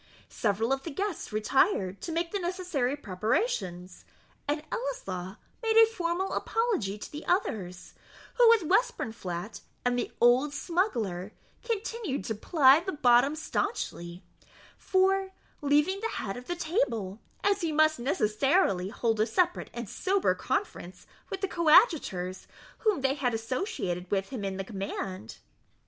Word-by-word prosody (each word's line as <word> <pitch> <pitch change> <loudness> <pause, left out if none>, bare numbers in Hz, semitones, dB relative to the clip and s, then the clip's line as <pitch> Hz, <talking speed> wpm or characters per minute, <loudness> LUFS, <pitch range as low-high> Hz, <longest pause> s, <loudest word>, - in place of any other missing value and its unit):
Several 225 +4 0
of 270 - -2
the 330 - -6
guests 380 - -3
retired 215 - +1
to 335 - -5
make 335 +1 -1
the 405 - -1
necessary 350 -8 -1
preparations; 190 - -2 0.4
and 300 +1 -1
Ellieslaw 470 - -4 0.2
made 450 -1 +2
a 450 - +10
formal 370 -3 -2
apology 415 - -1
to - - -9
the 300 +1 -7
others, 195 - -2 0.4
who, 480 -2 +6
with 455 -4 +5
Westburnflat 225 - -1 0.2
and 245 0 +2
the - - -3
old 255 +5 +4
smuggler, 220 - -1 0.3
continued 450 - -3
to 225 - -1
ply 275 - +5
the 375 +3 -4
bottle 265 0 +4
stanchly, 190 - -3 0.5
for 385 0 +1 0.3
leaving 295 +7 +2
the 455 +2 -3
head 195 -2 -3
of 250 0 -9
the 350 - -2
table, 235 - -1 0.2
as 405 0 +2
he 330 -2 0
must 310 -2 +3
necessarily 215 - +1
hold 225 0 -1
a 215 - +3
separate 355 +9 0
and 235 -2 -6
sober 385 - +1
conference 185 - -4 0.2
with 390 - -5
the 390 - 0
coadjutors 310 - +3 0.3
whom 425 -9 +1
they 270 0 +2
had 255 -5 -1
associated 220 - -3
with 195 -1 -1
him 250 -6 -5
in 195 -1 -3
the 195 - -3
command. 190 - -5
280 Hz, 140 wpm, -29 LUFS, -, 0.5 s, a